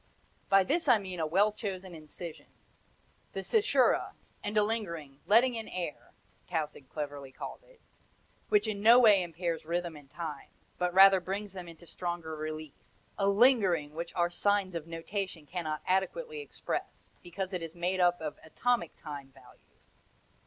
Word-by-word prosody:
By 195 0 +6
this 330 - 0
I 245 -4 +7
mean 185 -3 -6
a 160 - 0
well 200 +6 +4
chosen 190 -4 -5
incision 160 +1 -9 0.9
the - - -3
cesura, 440 -2 +3 0.3
and 210 +1 -2
a 210 - +6
lingering 170 -11 -3
"letting 240 +4 +5
in 225 -1 -4
air," 175 -4 -6 0.4
Tausig 155 -5 -3
cleverly 145 -3 -5
called 130 - -8
it - - -22 0.7
which 420 -1 +3
in 205 -2 -2
no 230 +3 +8
way 215 -6 +7
impairs 170 -1 -3
rhythm 170 0 -2
and 145 -2 -14
time, 155 -3 -6 0.3
but 180 0 +1
rather 195 +1 +8
brings 195 +2 -4
them 180 -2 -7
into 170 0 -12
stronger 170 -2 -4
relief; 155 -1 -5 0.5
a 195 - +2
LINGERING 200 - +4
which 170 +2 -5
our 175 0 +2
signs 200 0 +1
of 165 -2 -5
notation 165 0 -4
cannot 155 -2 -4
adequately 450 - 0
express, 440 - -5
because 185 +2 -5
it 180 - -2
is 165 0 -6
made 180 +2 -1
up 175 -1 +4
of 155 -2 -5
atomic 235 +2 0
time 145 -3 -8
values. - - -21
180 Hz, 160 wpm, -31 LUFS, 160-205 Hz, 0.9 s, no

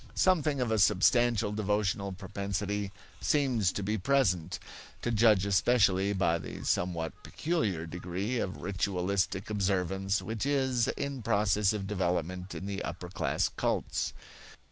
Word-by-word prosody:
Something 155 -6 +2
of 125 -3 0
a 110 - +2
substantial 110 +3 +4
devotional 105 -1 0
propensity 100 +1 -3 0.3
seems 125 -10 +2
to 100 - -3
be 105 +2 -1
present, 90 - +1 0.5
to 120 - 0
judge 105 -3 +4
especially 100 -1 +3
by 85 -4 +1
the - - -7
somewhat 85 -2 0
peculiar 110 - -1
degree 90 +7 -3
of 95 -3 -4
ritualistic 95 +1 -1
observance 95 0 0
which 110 -1 -4
is 130 -4 +1
in 140 -2 -3
process 105 -2 +2
of 105 -2 -3
development 90 -1 -2
in - - -5
the 100 0 -3
upper 90 +1 -6
class 95 - 0
cults. - - -1
100 Hz, 130 wpm, -30 LUFS, 95-115 Hz, 0.5 s, substantial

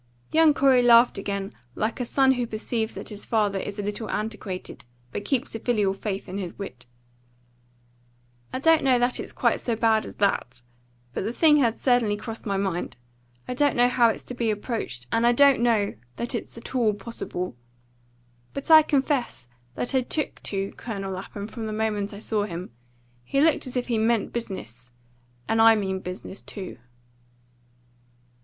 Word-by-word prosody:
Young 315 -2 +5
Corey 265 -2 +5
laughed 240 -2 +6
again 200 0 -3 0.2
like 220 +3 -2
a 245 - -2
son 265 +1 +4
who 245 -2 0
perceives 220 0 -2
that - - -5
his 210 -2 -5
father 205 -3 +1
is 200 +2 -5
a 205 - -3
little 210 +2 -4
antiquated, 210 -3 -4 0.3
but - - -4
keeps 270 +2 -1
a 225 - -4
filial 210 -5 +1
faith 195 0 -4
in 190 +2 -4
his 180 -3 -6
wit. 125 -12 -8 1.6
"I - - -2
don't 325 +4 +4
know 260 -2 +4
that 245 +1 +1
it's - - -5
quite - - +1
so 235 - -1
bad 220 -1 +2
as - - -10
that; 125 - -1 0.5
but - - -2
the 215 - -2
thing 300 +4 +5
had 235 -5 +2
certainly 240 -5 +2
crossed 225 +1 -7
my 200 -1 0
mind. 190 -3 -2 0.5
I - - -2
don't 285 +2 +2
know 245 0 +5
how 240 -1 +4
it's 220 - -3
to - - -8
be 235 -2 -1
approached, 210 - -3
and 230 +1 +3
I 240 - +5
don't 275 -1 +5
know 225 -4 +2 0.2
that 240 +3 -2
it's 235 - -5
at 230 - -9
all 230 -5 +2
possible. 195 - -5 1.0
But 275 +3 -3
I 315 0 +11
confess 270 - 0 0.3
that 245 - -2
I 260 - +3
'took 300 +4 -3
to' 195 -1 -3
Colonel 195 -4 -5
Lapham 200 +2 -6
from 225 0 -6
the 215 - -4
moment 215 -2 -1
I 200 - -8
saw 210 0 -1
him. 175 - -6 0.5
He 275 - -1
looked 305 -2 +3
as 255 - -4
if 245 - 0
he 235 -3 +1
'meant 225 -1 +1
business,' 130 - -6 0.6
and 225 0 +2
I 225 0 +8
mean 190 -3 -1
business 185 +1 -7
too." 190 - -8
225 Hz, 180 wpm, -25 LUFS, 200-245 Hz, 1.6 s, I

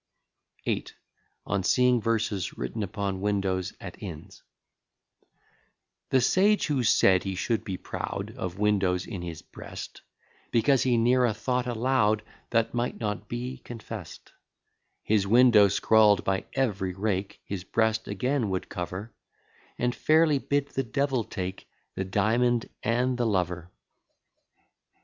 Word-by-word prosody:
VIII. - - -1 0.6
ON 100 -2 -1
SEEING 125 +3 +3
VERSES 105 -4 -1
WRITTEN 110 - -4
UPON 100 -1 -3
WINDOWS 95 -3 -1
AT - - -9
INNS - - -9 1.7
The 130 - +4
sage, 205 - +3
who 145 -4 0
said 95 -5 +4
he 95 -1 -3
should 110 +4 -1
be 95 -2 -4
proud - - -5
Of 90 0 -5
windows 100 -3 +1
in 100 -6 -6
his 85 -3 -7
breast, - - -9 0.5
Because 120 +2 +3
he 125 -1 +2
ne'er 125 +2 +4
a 110 - -1
thought 125 +3 -1
allow'd 115 -3 +1 0.3
That 115 -1 +1
might 120 0 -2
not 105 -2 -3
be 125 +2 -4
confest; 115 -5 -9 0.7
His 105 -2 +2
window 115 -2 +6
scrawl'd 105 0 +4
by 95 0 -1
every 100 -8 -1
rake, 100 -1 -2
His 95 -3 -5
breast 110 +2 0
again 125 +3 -1
would 95 -1 -3
cover, 90 +6 -5 0.6
And 120 0 0
fairly 155 -1 +3
bid 140 +1 -1
the 135 - -1
devil 135 0 0
take 95 -3 -6 0.2
The 95 - -3
diamond 115 +5 +1
and 125 +2 0
the 120 - +2
lover. 90 -4 -1
110 Hz, 130 wpm, -27 LUFS, 95-125 Hz, 1.7 s, window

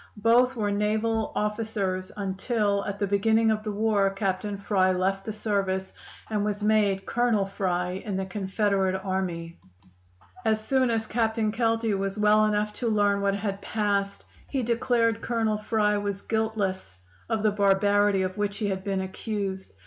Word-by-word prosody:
Both 240 +4 +4
were 210 -3 -1
naval 215 +2 0
officers, 210 -3 -2
until 200 +1 0
at 200 0 -4
the 200 - 0
beginning 220 +3 +3
of 215 0 0
the 215 0 -4
war 205 -1 +2
Captain 195 +1 -2
Fry 195 -2 +2
left 190 +1 0
the 220 - -3
service, 195 -3 -2 0.3
and 210 -2 -1
was 210 0 -2
made 205 -2 +2
Colonel 235 -4 +1
Fry 185 -1 -2
in 200 -4 -3
the 190 - -2
Confederate 195 0 0
Army. 175 -3 -3 0.8
"As 220 -2 +2
soon 260 +3 +1
as 225 -1 0
Captain 220 -1 0
Kelty 225 -1 +1
was 195 +1 -2
well 210 0 +4
enough 210 0 0
to 235 - +1
learn 205 -2 +2
what 200 0 +1
had 200 -1 -3
passed, 200 -2 -1 0.2
he 270 -3 -1
declared 230 -1 +1
Colonel 225 -3 0
Fry 210 -1 +1
was 200 -1 -4
guiltless 205 - -2 0.3
of 220 -1 0
the 215 - +4
barbarity 200 0 +3
of 185 +2 -4
which 205 -1 -1
he 210 -2 -1
had 190 -1 -3
been 195 -1 -1
accused. 190 0 -4
205 Hz, 160 wpm, -26 LUFS, 195-220 Hz, 0.8 s, Both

